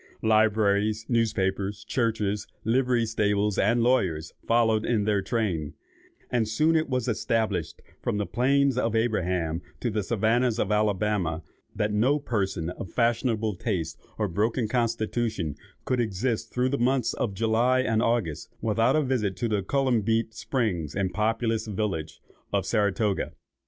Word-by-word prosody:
Libraries, 110 -1 +2
newspapers, 100 -3 0
churches, 105 -4 -1 0.2
livery 125 0 +2
stables, 105 -2 +1
and 115 +3 +3
lawyers, 90 -11 +1
followed 115 -2 +3
in 115 -3 +1
their 105 -1 +1
train; 95 - -2 0.6
and 115 -3 +1
it 155 +7 +2
was 125 -3 0
soon - - +2
established, 105 -6 -1 0.2
from - - -1
the 105 - -1
plains 135 +3 +2
of 115 -2 0
Abraham 90 -7 0 0.2
to 120 - -1
the 105 0 0
Savannahs 115 +3 +1
of 105 - 0
Alabama, 105 -5 0 0.3
that 105 0 0
no 125 +8 +3
person 95 - -2
of 90 - -7
fashionable 115 -2 +1
taste 90 -7 -3 0.2
or 105 - 0
broken 110 +6 0
constitution 115 - -1 0.3
could 125 - 0
exist 110 +1 -1
through 125 +1 +1
the 140 - -1
months 125 -1 +2
of 100 -5 -2
July 115 +4 +2
and 115 -3 +1
August 115 -11 -1
without 115 +3 +2
a 155 - +3
visit 115 -8 0
to 120 - -1
the 105 -3 0
chalybeate 115 -2 +1
springs 110 - -2
and 95 -2 -1
populous 110 +1 0
village 95 -7 -3 0.3
of - - 0
Saratoga. 105 -1 0
110 Hz, 140 wpm, -26 LUFS, 100-120 Hz, 0.6 s, and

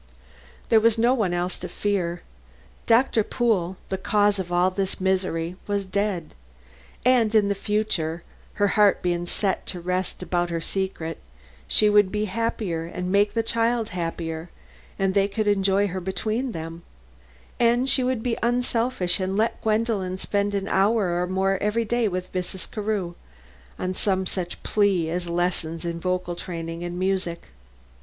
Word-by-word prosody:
There 225 - +6
was 230 0 +3
no 235 +3 +4
one 215 -8 +1
else 175 +1 -1
to - - -6
fear. 180 -4 -1 0.6
Doctor 230 -1 +4
Pool, 195 -7 0
the 190 - -2
cause 205 -1 +2
of 180 -2 -4
all 175 +1 +3
this 190 0 -2
misery, 185 -2 0
was 200 -1 -1
dead; 190 -3 -2 0.7
and 235 -4 +4
in 205 -2 +4
the - - +3
future, 190 -6 -1 0.3
her 205 -1 +2
heart 210 -1 +4
being 175 -1 0
set 195 +1 -1
to 180 - -3
rest 180 +1 -2
about 175 0 0
her 170 -1 -1
secret, 170 -2 -3 0.5
she 215 - +4
would 205 -2 +5
be 210 0 0
happier 200 -5 -2
and 180 +1 -4
make 205 +2 +3
the 225 - +2
child 230 0 +1
happier, 165 -1 -4 0.5
and 195 -1 +1
they 200 0 +3
could 210 +1 -2
enjoy 195 0 +3
her 185 +1 -4
between 220 +7 -2
them, 165 -2 -6 0.8
and 240 +2 +3
she 265 -1 +4
would 250 -3 0
be 240 -2 0
unselfish 240 -5 +1
and 190 +1 -1
let 220 +2 +1
Gwendolen 215 -4 0
spend 200 +1 -1
an 195 0 -2
hour 195 -3 +2
or 180 - 0
more 190 +1 +1
every 215 +3 +1
day 235 +1 +1
with 185 -1 -4
Mrs. 185 0 -4
Carew, 205 -5 -2 0.6
on 185 0 -2
some 190 0 0
such 180 -1 -4
plea 195 -6 +2
as 175 0 -2
lessons 170 -1 -1
in 170 0 -3
vocal 180 0 -1
training 165 -1 -5
and 175 0 -4
music. 185 -2 -1
190 Hz, 160 wpm, -25 LUFS, 175-215 Hz, 0.8 s, There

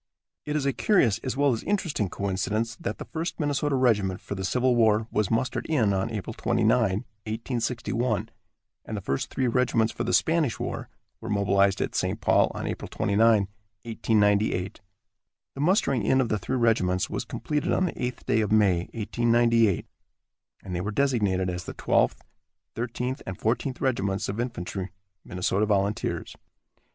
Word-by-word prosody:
It 150 - -1
is 150 -2 0
a 140 - +1
curious 120 - +3
as 130 +2 -4
well 140 -2 +3
as 115 - -3
interesting 170 - -1
coincidence, 100 +5 -2
that 170 - -4
the - - -7
First 165 +1 -4
Minnesota 145 -1 0
Regiment 105 -8 +2
for - - -6
the 95 -1 -4
Civil 125 +5 +2
War 110 -2 +3
was 105 -2 0
mustered 120 +3 -1
in 115 -11 +2
on 95 +2 0
April 110 0 -5
29, 115 -1 0
1861, 115 +1 -2 0.5
and 110 - -5
the - - -4
first 70 -5 -2
three 130 - -1
regiments 115 -2 +2
for - - -3
the - - -1
Spanish 160 -7 +2
War - - -4 0.3
were 115 - -7
mobilized 100 -1 +2
at - - -2
St. - - -1
Paul - - +3
on - - -4
April - - -4
29, 110 +1 +3 0.4
1898. 105 -4 +1 0.7
The 135 - -5
mustering 150 - +2
in 130 +6 +3
of 125 -4 +1
the 105 - 0
three 130 +8 -2
regiments 95 -6 +2
was - - -3
completed 150 -1 -2
on 185 - +2
the 165 - -4
eighth 125 0 -4
day 110 - +2
of 105 - -1
May, 95 -5 +3
1898, 115 -2 +2 0.8
and 90 -2 -5
they 85 - -1
were 100 - -3
designated 105 -7 +1
as 90 -1 -4
the - - -7
Twelfth, - - +1 0.5
Thirteenth 125 +3 -3
and 95 -1 -5
Fourteenth 125 +4 -1
Regiments 100 -7 0
of 105 +3 -4
Infantry, 100 -5 -4 0.3
Minnesota 95 +3 0
Volunteers. 100 0 -1
115 Hz, 165 wpm, -26 LUFS, 100-125 Hz, 0.8 s, curious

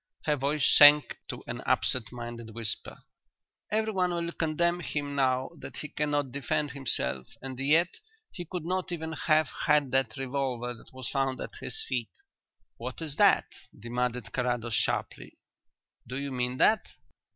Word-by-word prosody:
Her 150 - +3
voice 140 +1 +1
sank 145 0 +7
to - - -6
an - - -5
absent 125 -5 +1
minded 120 -2 -7
whisper. 115 -3 -3 0.7
"Everyone 210 -4 +1
will 170 0 -2
condemn 170 +2 +1
him 145 -4 -3
now 130 -2 +1
that - - -8
he 150 - -5
cannot 145 -2 -1
defend 140 +2 -1
himself, 115 - -2
and 130 -1 -7
yet 155 +6 +3 0.3
he 175 - -6
could 170 -1 -5
not 185 +1 -1
even 160 -2 -3
have 155 -1 +3 0.2
had 150 -3 +4
the 135 -4 +2
revolver 130 -2 -2
that 115 - -15
was 130 -1 -6
found 135 -2 0
at - - -6
his 440 - -3
feet." - - -2 0.7
"What - - -6
is 155 -4 -4
that?" - - +5 0.3
demanded 120 0 -2
Carrados 120 -2 -1
sharply. - - -1 0.7
"Do 125 +2 -4
you 140 0 -3
mean 125 0 -1
that?" 220 +9 +4
140 Hz, 150 wpm, -29 LUFS, 125-155 Hz, 0.7 s, sank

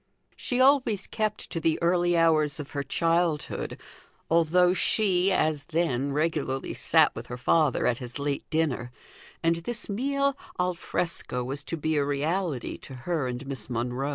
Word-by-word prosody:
She 245 - -2
always 255 -7 +4
kept 215 -1 -3
to 165 - -2
the 160 -1 +1
early 175 0 +2
hours 155 -3 +3
of 145 -1 -7
her 140 - -2
childhood, 165 +2 0 0.5
although 170 +2 +4
she, 190 0 +2
as 155 -5 +1
then, 145 -5 0
regularly 145 -3 -1
sat - - +4
with - - -7
her 125 - -6
father 150 +2 +2
at 120 - +1
his 125 0 -7
late 140 0 -3
dinner; 145 -6 -1 0.5
and 165 0 +3
this 235 +8 -4
meal 275 +6 0 0.2
al 180 0 +1
fresco 165 -6 -2
was 135 +3 -4
to 165 - -3
be 155 0 0
a 145 - +3
reality 145 0 -1
to 135 - -10
her 165 -7 0
and 125 +2 -5
Miss 135 -5 -5
Monro. 125 +3 -2
160 Hz, 160 wpm, -27 LUFS, 140-180 Hz, 0.5 s, always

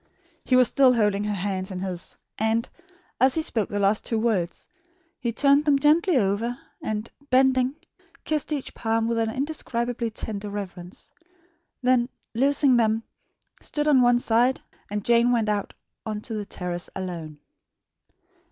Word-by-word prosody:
He 255 - +2
was 255 -1 +6
still 265 -2 +4
holding 210 -3 +2
her 210 - -1
hands 190 -1 -3
in 190 - -5
his; 185 -1 -5 0.2
and, 225 +2 +1 0.5
as 260 +2 +4
he 320 - +1
spoke 220 -8 -1
the 205 - -3
last 200 +1 +2
two 230 - -1
words, 210 -7 -1 0.5
he 235 - -1
turned 280 +4 +4
them 290 -2 +4
gently 310 +3 +3
over 225 +3 0 0.2
and, 215 +1 -3 0.2
bending, 260 0 +3 0.5
kissed 305 -1 -1
each 290 -3 -3
palm 225 0 0
with 230 0 0
an 225 -1 +1
indescribably 245 -3 -2
tender 210 -2 -5
reverence; 185 -3 -7 0.7
then, 250 -1 +3 0.2
loosing 275 +1 +4
them, 225 -1 +2 0.6
stood 295 0 -2
on 280 -4 +5
one 245 0 +5
side, 240 +2 +2 0.3
and 205 -1 -3
Jane 235 +1 +4
went 230 -3 +1
out 205 -1 -1 0.3
on 215 -1 -4
to 225 - -7
the 210 -1 -3
terrace 175 -1 -4
alone. 170 -5 -5
230 Hz, 150 wpm, -25 LUFS, 205-255 Hz, 0.7 s, was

